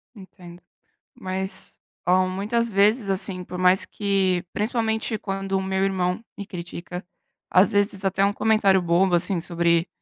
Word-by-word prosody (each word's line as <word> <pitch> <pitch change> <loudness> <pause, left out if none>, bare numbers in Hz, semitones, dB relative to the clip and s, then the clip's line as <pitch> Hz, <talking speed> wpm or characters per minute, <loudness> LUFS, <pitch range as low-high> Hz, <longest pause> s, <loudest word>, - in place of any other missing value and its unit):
Entendo. 180 -3 -14 0.5
Mas, 190 +1 -5 0.3
oh, 185 +1 +4
muitas 210 +5 -1
vezes, 210 +1 +2
assim, 190 -1 +1
por 180 0 -8
mais 185 +1 +5
que 195 -3 0
principalmente, 220 0 -1
quando 195 -1 -5
o - - -2
meu 190 0 -1
irmão 185 +2 -1
me 200 -1 -7
critica. 180 +1 -7 0.5
Às 190 +4 +6
vezes 200 -1 0
até 195 +1 +1
um 200 - +2
comentário 205 -3 +2
bobo, 175 +2 +2
assim, 175 +2 +2
sobre 170 0 +1
190 Hz, 145 wpm, -23 LUFS, 180-205 Hz, 0.5 s, Às